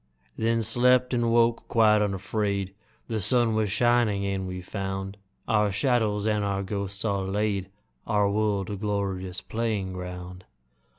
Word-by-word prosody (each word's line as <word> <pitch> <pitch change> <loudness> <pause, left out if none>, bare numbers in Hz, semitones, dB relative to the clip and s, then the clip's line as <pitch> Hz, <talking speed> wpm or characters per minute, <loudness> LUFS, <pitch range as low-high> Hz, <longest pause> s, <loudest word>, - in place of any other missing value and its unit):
Then 115 0 +1
slept, 125 +3 +3
and 120 -1 +1
woke 115 0 +2
quite 110 -2 +4
unafraid. 100 -1 -1 0.3
The 110 -2 -2
sun 115 +3 +3
was 110 -2 0
shining, 120 -3 +2
and 95 -1 -2
we 90 0 -5
found 95 0 -4 0.3
Our 105 -2 +2
shadows 105 -1 +1
and 105 -1 +1
our 100 -1 -1
ghosts 100 +1 -4
all 100 -3 0
laid, 100 -1 -1 0.4
Our 105 -2 +2
world 100 -1 0
a - - -2
glorious 95 -3 -3
playing 110 -5 -2
ground. 90 0 -7
105 Hz, 140 wpm, -26 LUFS, 95-110 Hz, 0.4 s, quite